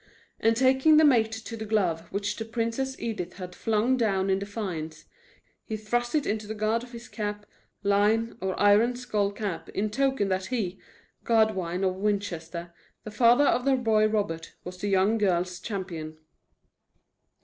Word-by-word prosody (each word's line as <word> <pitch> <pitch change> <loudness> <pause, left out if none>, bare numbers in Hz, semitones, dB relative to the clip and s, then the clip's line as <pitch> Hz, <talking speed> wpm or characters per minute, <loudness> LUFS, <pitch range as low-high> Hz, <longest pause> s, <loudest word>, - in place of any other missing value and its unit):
And, 225 0 +2
taking 265 +4 +5
the 315 - +7
mate 230 -6 +4
to 225 +1 -6
the 220 - -6
glove 175 -6 0
which 200 +1 -2
the 225 - -4
Princess 230 +4 -2
Edith 180 -6 -4
had 180 -2 -8
flung 225 +6 +1
down 195 -5 +1
in 190 - +2
defiance, 180 -7 -5 0.6
he 220 - -4
thrust 240 +5 -1
it 300 - +1
into 210 0 -2
the 220 - -5
guard 215 +2 0
of 245 0 -11
his 235 0 -9
cappe. 210 -1 -4 0.4
line, 210 +3 +2
or 190 -1 -2
iron 210 +4 +4
skull 210 -5 -1
cap, 200 -4 -5
in 210 +1 -2
token 265 -3 +1
that 185 0 -1
he, 200 -7 -2 0.4
Godwine 195 -6 +1
of 185 -1 0
Winchester, 175 -4 -3 0.3
the 215 - -7
father 240 +5 +5
of 245 - +2
the 270 0 +3
boy 220 -4 +3
Robert, 200 -7 -2
was 180 +1 -8
the 205 - -2
young 195 +3 +3
girl's 180 -3 0
champion. 170 -7 -5
210 Hz, 165 wpm, -27 LUFS, 190-230 Hz, 0.6 s, the